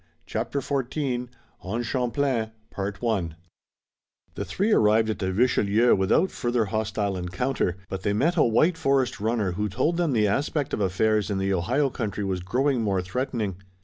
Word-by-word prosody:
CHAPTER 115 +8 -2
XIV 130 -2 -2 0.3
ON 110 +6 -3
CHAMPLAIN 125 -2 -1 1.8
The - - -4
three 205 +4 0
arrived 110 - +4
at - - -5
the 95 -1 -1
Richelieu 115 +1 +3
without 95 - +2
further 120 -2 0
hostile 105 -1 -1
encounter, 90 +2 -1
but 95 -1 -5
they 100 - 0
met 155 +12 +2
a 165 - +3
white 155 +9 +3
forest 135 -4 +1
runner 110 -2 0
who 105 +4 -2
told 165 - 0
them 170 -5 +1
the 105 -3 +3
aspect 140 +6 -1
of - - -1
affairs 105 +2 +1
in 100 - -1
the 95 0 0
Ohio 125 +11 +1
country 105 -4 -3
was 95 -2 -1
growing 125 +8 0
more 95 -4 0
threatening. 105 -1 -2
110 Hz, 155 wpm, -25 LUFS, 100-130 Hz, 1.8 s, arrived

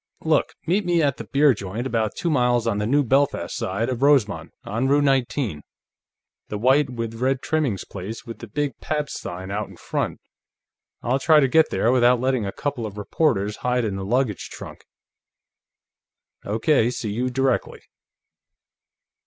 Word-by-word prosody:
Look, - - +1
meet 195 +5 +1
me 175 -2 +2
at 140 -2 +1
that - - -9
beer 140 0 +5
joint, 105 +3 -5
about 110 -5 -1
two 170 - -1
miles 125 -4 +2
on 110 -3 0
the 105 - -1
New 145 +4 +3
Belfast 135 -8 +1
side 100 +5 -2
of 125 -1 -3
Rosemont, 135 -8 +2
on 115 +6 -1
Route 145 +1 +3
19; 130 - 0 0.9
the 105 - -4
white 130 +5 +3
with 115 -2 -5
red 135 0 +1
trimmings 150 - -1
place 100 +4 -7
with 115 -2 -8
the 115 - -8
big 140 +3 -2
Pabst 150 -2 -2
sign 95 +2 -6
out 105 +2 -3
in - - -14
front. - - -3 0.8
I'll 130 +3 +1
try 155 +2 +5
to 135 - +4
get 160 +4 +4
there 115 - +1
without 125 -1 +4
letting 130 -4 0
a - - -3
couple 135 -4 -3
of 105 0 -10
reporters 105 -2 0
hide 125 -1 0
in 100 -3 -2
the 95 - -4
luggage 120 0 -1
trunk." - - -10 1.6
"Okay; 115 +3 +2
see 115 -3 -4
you 125 +5 -1
directly." 130 0 -1
125 Hz, 170 wpm, -23 LUFS, 105-140 Hz, 1.6 s, beer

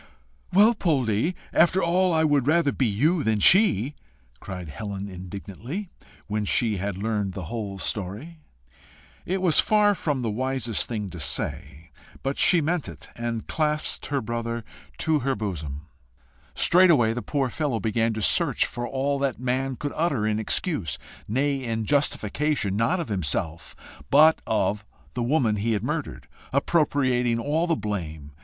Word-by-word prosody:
"Well, 210 +5 +6
Poldie, 145 - 0 0.2
after 185 +3 +4
all 180 +2 +2
I 160 -1 +2
would 145 -4 +2
rather 160 -2 +3
be 130 - 0
you 150 - +1
than 110 -1 +1
she!" 155 - +5 0.5
cried 90 -2 -7
Helen 100 +4 -6
indignantly, 100 - -7 0.3
when 105 0 -2
she 105 +1 +1
had 100 0 -3
learned 105 -2 -2
the 95 -1 -6
whole 105 -4 -4
story. 105 - -4 0.9
It 185 +1 -1
was 170 -4 +4
far 210 -1 +4
from 145 -8 -2
the 115 - -1
wisest 130 -1 -1
thing 105 -5 -4
to 85 - -8
say, 75 +1 -3 0.3
but 135 +1 -2
she 175 -3 +5
meant 160 +1 -1
it, - - -11
and 115 -1 -4
clasped 150 -1 -1
her 140 -2 -1
brother 115 +1 -3 0.3
to 160 -2 +1
her 135 0 -1
bosom. 80 -8 -5 0.7
Straightway 170 -11 +5
the 120 - -4
poor 135 +3 -1
fellow 145 -7 -1
began 115 +2 0
to 110 - -3
search - - +3
for 120 0 -4
all 140 +2 -1
that 135 -4 -1
man 130 +1 -1
could 145 +3 -5
utter 145 -10 0
in 110 0 0
excuse, 110 - -1 0.3
nay 135 +4 0
in 115 -2 -2
justification, 140 -4 0
not 115 - +1
of 165 - -4
himself, 85 -3 -2 0.3
but 155 +3 +6
of 105 -1 0 0.3
the 125 - -3
woman 120 -4 +1
he 110 +3 0
had 105 - -2
murdered, - - -4 0.2
appropriating 130 -5 +1
all 155 +7 0
the 165 - +2
blame. 80 -9 -5
120 Hz, 155 wpm, -25 LUFS, 105-150 Hz, 0.9 s, Well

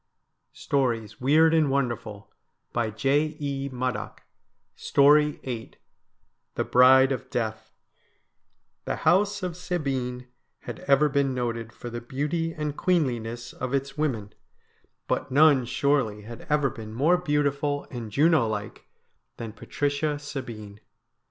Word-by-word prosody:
92 - - -18
STORIES 115 -6 -1
WEIRD 160 +5 +5
AND 155 -3 +3
WONDERFUL 115 -6 -3 0.4
VIII 140 +5 -1
THE 130 -1 -3 2.5
BRIDE 130 +1 +6
OF 130 - -4
DEATH 110 -2 -3 1.1
The - - -1
house 200 +4 +2
of 180 -2 -3
Sabine 135 -9 -3 0.4
had - - -7
ever 140 +2 +5
been 140 -2 0
noted 115 -2 -3
for 120 +1 -9
the 120 0 -5
beauty 150 +7 -2
and 150 -2 -4
queenliness 120 - -1
of 130 +2 -3
its 135 0 -3
women, 125 -10 -2 0.7
but - - -1
none 140 -2 +5
surely 125 -6 0
had 115 +2 -10
ever 145 -3 +2
been 110 -4 -9
more 160 +8 +3
beautiful 145 -3 0
and 120 -4 -6
Juno 150 -1 +4
like 105 -1 -5 0.5
than 115 -2 -6
Patricia 145 +6 -2
Sabine. 115 -8 -7
135 Hz, 115 wpm, -26 LUFS, 120-150 Hz, 2.5 s, BRIDE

